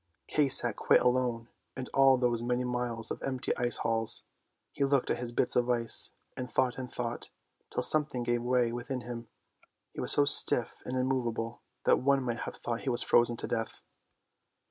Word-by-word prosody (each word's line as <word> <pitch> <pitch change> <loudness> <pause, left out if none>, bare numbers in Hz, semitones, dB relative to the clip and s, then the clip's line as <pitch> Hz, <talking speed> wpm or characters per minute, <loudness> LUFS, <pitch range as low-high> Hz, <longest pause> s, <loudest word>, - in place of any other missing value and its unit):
Kay 150 -2 +2
sat 120 -4 +2
quite - - +4
alone 125 -2 +1 0.3
in 130 - -3
all 135 -1 +6
those 120 -2 +1
many 125 +1 0
miles 125 -2 -2
of - - -4
empty 130 -2 -1
ice 120 0 -1
halls. 115 -1 -1 0.5
He 140 - -1
looked 140 -1 +2
at - - -1
his 120 -1 -3
bits 120 - +1
of 125 0 +2
ice, 115 -2 0 0.3
and 125 0 -6
thought 130 -1 +1
and 125 -1 -6
thought, 120 -1 -4 0.4
till - - -1
something 150 -5 0
gave 120 0 0
way 125 -1 +2
within 125 +2 -4
him. 120 -1 -7 0.7
He - - -5
sat - - -1
so 145 - +4
stiff 125 -4 +3
and 130 - -3
immovable 120 -3 -1 0.2
that - - +5
one 140 0 +2
might 120 -2 -2
have - - -12
thought 120 -1 -4
he - - -2
was 120 -1 0
frozen 120 0 +3
to - - -3
death. 115 0 -3
125 Hz, 190 wpm, -30 LUFS, 120-130 Hz, 0.7 s, all